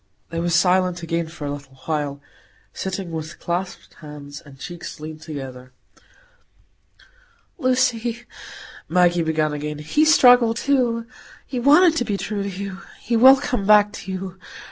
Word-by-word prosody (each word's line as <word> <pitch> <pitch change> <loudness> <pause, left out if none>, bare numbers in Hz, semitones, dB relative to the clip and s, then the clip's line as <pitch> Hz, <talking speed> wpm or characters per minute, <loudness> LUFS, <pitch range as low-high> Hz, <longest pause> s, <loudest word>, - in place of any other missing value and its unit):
They 165 - -3
were 175 +1 -1
silent 180 0 +2
again 165 0 -2
a 160 -1 -10
little 140 -2 -9
while, 145 -3 -2 0.5
sitting 190 -2 -5
with 160 0 -6
clasped 180 +2 -4
hands, 145 -1 -10
and 140 -2 -15
cheeks 170 +4 -8
leaned 155 0 -8
together. 130 -5 -8 1.9
"Lucy," 245 -3 0 0.6
Maggie 175 0 +3
began 155 -2 0
again, 150 0 -4
"he 150 - +1
struggled 245 -7 +6
too. 240 -4 +1 0.4
He 255 - -4
wanted 305 +6 +5
to 245 - 0
be 205 -3 -2
true 205 0 -4
to 200 - -3
you. 195 0 -6 0.2
He 235 - -2
will 260 +4 +8
come 250 -7 -3
back 210 -1 +5
to 190 - -7
you. 185 0 -6
180 Hz, 145 wpm, -22 LUFS, 155-230 Hz, 1.9 s, will